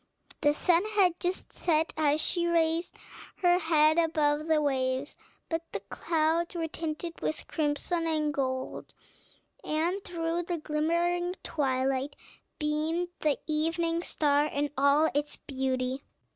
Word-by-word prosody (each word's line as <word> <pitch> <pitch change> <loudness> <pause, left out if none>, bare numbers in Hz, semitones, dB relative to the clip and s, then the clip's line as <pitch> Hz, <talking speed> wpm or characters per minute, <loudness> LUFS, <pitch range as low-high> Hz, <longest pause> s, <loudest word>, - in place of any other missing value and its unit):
The 290 0 +3
sun 345 +3 +4
had 365 -4 +4
just 360 +1 -3
set 320 -1 +1
as 300 -1 +2
she 345 +2 +1
raised 330 0 +1 0.5
her 355 0 +5
head 315 -1 +4
above 305 -2 +1
the 315 -1 +3
waves; 265 -1 -1 0.3
but 325 0 -1
the - - -1
clouds 330 +2 0
were 330 -1 -1
tinted 325 +1 -5
with 310 - -2
crimson 325 +2 -1
and 305 -2 0
gold, 260 -2 -3 0.7
and 340 +6 -1
through 335 0 -2
the 350 0 -3
glimmering 340 +4 0
twilight 270 -1 0 0.4
beamed 315 +3 -1
the 300 -2 +2
evening 330 +2 0
star 295 -3 +2
in 290 0 -2
all 280 +3 +4
its 290 +1 -1
beauty. 260 -1 -2
315 Hz, 130 wpm, -29 LUFS, 290-335 Hz, 0.7 s, her